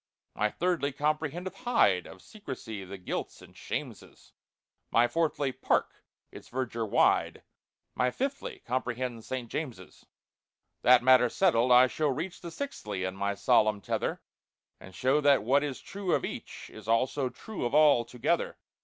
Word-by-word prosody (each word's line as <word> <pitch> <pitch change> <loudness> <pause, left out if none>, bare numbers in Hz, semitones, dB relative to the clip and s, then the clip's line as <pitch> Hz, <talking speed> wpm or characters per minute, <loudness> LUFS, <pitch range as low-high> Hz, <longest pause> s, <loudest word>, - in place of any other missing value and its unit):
"My 105 - +1
'Thirdly' 165 -2 -1
comprehendeth 155 +5 -2
'Hyde,' 105 - +2
Of 95 - -13
Secresy 130 - -8
the 100 +1 -8
guilts 90 - -5
and - - -16
shameses; - - -7 0.6
My 120 +1 +4
'Fourthly'—'Park'—its 150 -3 -2
verdure 120 -3 -3
wide— - - +2 0.5
My 125 0 +1
'Fifthly' 275 - -4
comprehends 125 -2 -3
'St. 130 -2 -4
James's.' 115 - -7 0.7
"That 125 -1 +6
matter 130 -1 +6
settled, 125 -7 +2
I 125 +1 +8
shall 150 +4 -1
reach 160 +7 -4
The 170 - -6
'Sixthly' 105 - -5
in 95 0 -3
my 100 +1 -1
solemn 105 +1 +3
tether, - - -3 0.6
And 95 -1 -13
show 135 +4 +2
that 140 -1 +4
what 140 +5 +3
is 140 -3 -4
true 195 -2 -2
of - - -1
each, - - -8
Is 110 -1 -12
also 130 +4 +1
true 220 - -7
of 120 +3 -1
all, 150 -5 +6
together. 120 0 -1
130 Hz, 145 wpm, -29 LUFS, 115-155 Hz, 0.7 s, I